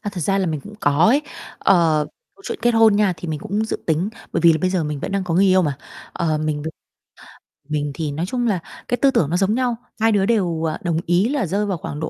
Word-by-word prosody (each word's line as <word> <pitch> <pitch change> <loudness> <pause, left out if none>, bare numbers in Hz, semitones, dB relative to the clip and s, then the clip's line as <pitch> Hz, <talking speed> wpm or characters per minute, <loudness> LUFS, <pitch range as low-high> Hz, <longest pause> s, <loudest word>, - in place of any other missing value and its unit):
À, 205 -1 -4
thật 180 - -5
ra 195 +5 +1
là 190 - 0
mình 155 -3 -2
cũng 205 +6 -12
có 145 +5 +3
ấy. 270 +7 +4 0.4
Ờ, 165 -5 +3 0.3
câu 390 - -19
chuyện 460 - -4
kết 240 - +4
hôn 225 -2 +5
nha, 205 -3 +3
thì 165 +1 -7
mình 155 -2 -3
cũng 210 +3 -2
dự - - -3
tính, 165 +5 +1 0.2
bởi - - 0
vì 170 -1 +6
là 160 - 0
bây 185 - +1
giờ 180 -4 0
mình 150 -2 -4
vẫn 195 - -4
đang 195 -1 -1
có 170 -2 -2
người 190 +3 +4
yêu 185 0 +4
mà, 145 -4 -1 0.4
ờ, 155 -2 -1
mình 150 -1 -2
b - - -7 1.0
mình 145 -1 -1
thì 150 -1 -3
nói 160 +5 -2
chung 245 +3 -1
là 195 -5 +1 0.3
cái 245 - 0
tư 275 -1 +4
tưởng 150 - +1
nó 175 - +1
giống 195 +3 +2
nhau, 250 -2 0 0.2
hai 225 +1 +3
đứa 195 -2 +2
đều, 180 -8 0
ờ, 155 -1 -1
đồng 170 -2 0
ý 180 +7 +2
là 275 -6 0
rơi 200 +4 -1
vào 195 -3 -2
khoảng 150 -1 -6
độ 155 - -3
180 Hz, 280 wpm, -21 LUFS, 155-210 Hz, 1.0 s, vì